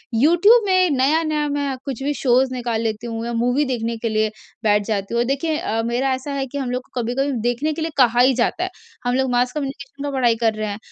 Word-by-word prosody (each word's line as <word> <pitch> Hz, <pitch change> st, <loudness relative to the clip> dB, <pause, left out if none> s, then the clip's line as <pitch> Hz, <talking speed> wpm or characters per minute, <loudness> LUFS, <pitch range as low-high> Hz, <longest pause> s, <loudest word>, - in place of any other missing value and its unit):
YouTube 350 Hz, -, +5 dB
में 370 Hz, -1 st, +4 dB
नया-नया 300 Hz, +3 st, +1 dB
मैं 285 Hz, -1 st, -1 dB
कुछ 270 Hz, -2 st, -4 dB
भी 290 Hz, +1 st, 0 dB
शोज़ 255 Hz, 0 st, +3 dB
निकाल 240 Hz, -3 st, -2 dB
लेती 225 Hz, +1 st, -3 dB
हूँ 230 Hz, 0 st, -4 dB
या 235 Hz, -, -3 dB
मूवी 245 Hz, +5 st, +1 dB
देखने 235 Hz, -3 st, -2 dB
के 230 Hz, +1 st, -2 dB
लिए 215 Hz, 0 st, +1 dB, 0.3 s
बैठ 210 Hz, -1 st, +3 dB
जाती 205 Hz, 0 st, -2 dB
हूँ। 235 Hz, -, +3 dB
देखिए 290 Hz, +4 st, -1 dB
अ, 225 Hz, -5 st, -1 dB
मेरा 250 Hz, +3 st, 0 dB
ऐसा 265 Hz, +3 st, -7 dB
है 275 Hz, -1 st, -1 dB
कि 285 Hz, -, -6 dB
हम 255 Hz, -3 st, -3 dB
लोग 250 Hz, 0 st, -2 dB
को 250 Hz, -, -3 dB
कभी-कभी 260 Hz, +5 st, -1 dB, 0.2 s
देखने 285 Hz, +6 st, -1 dB
के 320 Hz, -, -5 dB
लिए 325 Hz, -, -2 dB
कहा 245 Hz, -2 st, +4 dB
ही 260 Hz, +1 st, +5 dB
जाता 250 Hz, +8 st, 0 dB
है। 370 Hz, -, -2 dB, 0.4 s
हम 245 Hz, 0 st, +1 dB
लोग 265 Hz, -1 st, +1 dB
मास 245 Hz, +1 st, +2 dB
कम्युनिकेशन 280 Hz, -1 st, -6 dB
का 290 Hz, -, -2 dB
पढ़ाई 240 Hz, -3 st, +3 dB
कर 220 Hz, -, +3 dB
रहे 215 Hz, 0 st, -3 dB
हैं, 205 Hz, -, -4 dB
255 Hz, 240 wpm, -21 LUFS, 235-285 Hz, 0.4 s, YouTube